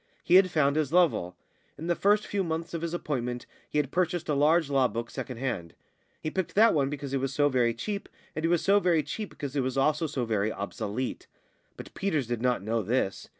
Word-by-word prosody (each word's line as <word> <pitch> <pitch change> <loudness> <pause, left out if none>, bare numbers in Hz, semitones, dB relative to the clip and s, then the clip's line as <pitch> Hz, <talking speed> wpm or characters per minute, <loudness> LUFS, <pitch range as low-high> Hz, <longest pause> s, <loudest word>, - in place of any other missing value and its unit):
He - - 0
had 185 0 +7
found 150 -3 +2
his 150 -3 0
level. 165 - +2 0.4
In 160 - -7
the 175 - +2
first 205 +4 +2
few 200 -1 -1
months 165 0 -3
of 165 - -3
his 170 -1 -2
appointment 125 -7 -3 0.2
he - - -2
had 145 -2 0
purchased 175 -1 0
a - - +2
large 155 +3 +3
law 135 -2 +3
book 115 -1 -5
second 125 - -6
hand. 115 -10 -4 0.5
He 155 - -2
picked 190 -3 -3
that 225 +3 +6
one 140 -3 +2
because 140 -1 -5
it 135 - +1
was 135 0 -3
so 145 -1 +3
very 120 -3 +2
cheap, 200 - -4 0.3
and 155 - -3
it - - +3
was 170 -1 +2
so 200 +1 +5
very 170 -5 +2
cheap 215 -2 -5
because 140 -1 -7
it 140 - +2
was 130 +1 -2
also 150 +4 +2
so 135 -5 -2
very 110 -1 0
obsolete; 110 +4 -4 0.5
but - - -10
Peters 160 -9 -1
did 120 -1 -3
not 125 -5 +1
know 115 +2 0
this. 105 -1 -1
145 Hz, 230 wpm, -28 LUFS, 125-170 Hz, 0.5 s, had